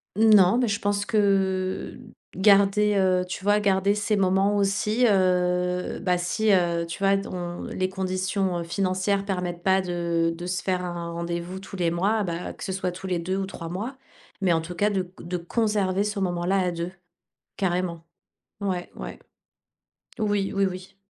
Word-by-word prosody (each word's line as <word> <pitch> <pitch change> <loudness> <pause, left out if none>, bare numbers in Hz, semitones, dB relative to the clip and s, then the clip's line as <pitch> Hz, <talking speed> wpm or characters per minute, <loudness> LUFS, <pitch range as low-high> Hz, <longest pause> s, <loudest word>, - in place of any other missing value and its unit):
Non, 215 0 +6
mais 245 - +2
je 205 0 -1
pense 205 0 -1
que 195 -2 +1 0.4
garder, 200 +1 +4
heu, 185 -1 +2
tu 185 - -6
vois? 205 +1 +4
Garder 200 0 +2
ces 210 0 0
moments 195 +1 +2
aussi, 210 +4 +2
heu, 180 -2 +1
bah, 180 -1 +2
si 210 +5 +1
heu, 170 -2 +2
tu 170 - -7
vois? 195 0 +3
Dont 175 -3 -5
les 185 0 -2
conditions, 185 -1 -1
heu, - - -3
financières 190 +2 0
permettent 180 -3 -3
pas 190 0 +3
de 170 -2 0
de 175 - -6
se 180 -1 -2
faire 180 -1 -1
un 170 -1 -4
rendez-vous 170 +2 -4
tous 195 0 -9
les 175 -2 +1
mois, 200 +6 +1
bah, 170 -1 -4
que - - -10
ce 190 - -3
soit 185 -1 -2
tous 190 +2 -8
les 180 -2 0
2 185 +3 -2
ou 195 -1 -2
3 165 -3 -7
mois. 225 +9 -5 0.4
Mais, 190 -3 +2
en 165 - +1
tout 175 +2 -7
cas 210 +2 +2
de 190 -2 +1
c 180 - -14 0.2
de 180 +1 -2
conserver 200 +1 0
ce 210 -1 -2
moment-là 180 +1 0
à 180 -1 +1
2. 170 +1 -4 0.6
Carrément. 175 -3 -1 0.6
Ouais, 185 -3 -2
ouais. - - -7 1.0
Oui, 205 -3 0
oui, 195 0 +3
oui. 185 +1 -6
185 Hz, 180 wpm, -25 LUFS, 180-200 Hz, 1.0 s, Non